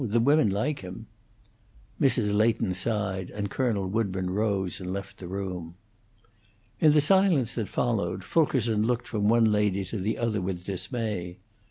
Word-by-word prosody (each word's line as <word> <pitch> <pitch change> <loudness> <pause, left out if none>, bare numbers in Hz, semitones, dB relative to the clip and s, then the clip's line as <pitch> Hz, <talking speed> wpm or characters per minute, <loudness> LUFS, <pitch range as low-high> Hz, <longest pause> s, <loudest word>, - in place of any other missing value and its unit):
The 115 0 +1
women 140 -1 +4
like 110 +10 -1
him." 90 -1 -8 1.0
Mrs. 120 -6 +2
Leighton 110 -2 +2
sighed, 95 -2 -2
and 100 -1 -4
Colonel 110 -7 0
Woodburn 95 -3 -1
rose 100 -2 -1
and 90 0 -4
left 100 0 -6
the 90 - -7
room. 90 -3 -5 1.0
In 155 -2 +5
the 150 - +5
silence 160 - +3
that 110 -6 -3
followed, 100 -6 -1
Fulkerson 120 - +1
looked 120 +2 0
from 105 -2 0
one 115 0 +5
lady 105 -2 +1
to 100 +3 -5
the 105 +4 -1
other 110 -4 -1
with 90 -1 -4
dismay. 95 -2 -3
105 Hz, 155 wpm, -27 LUFS, 95-115 Hz, 1.0 s, In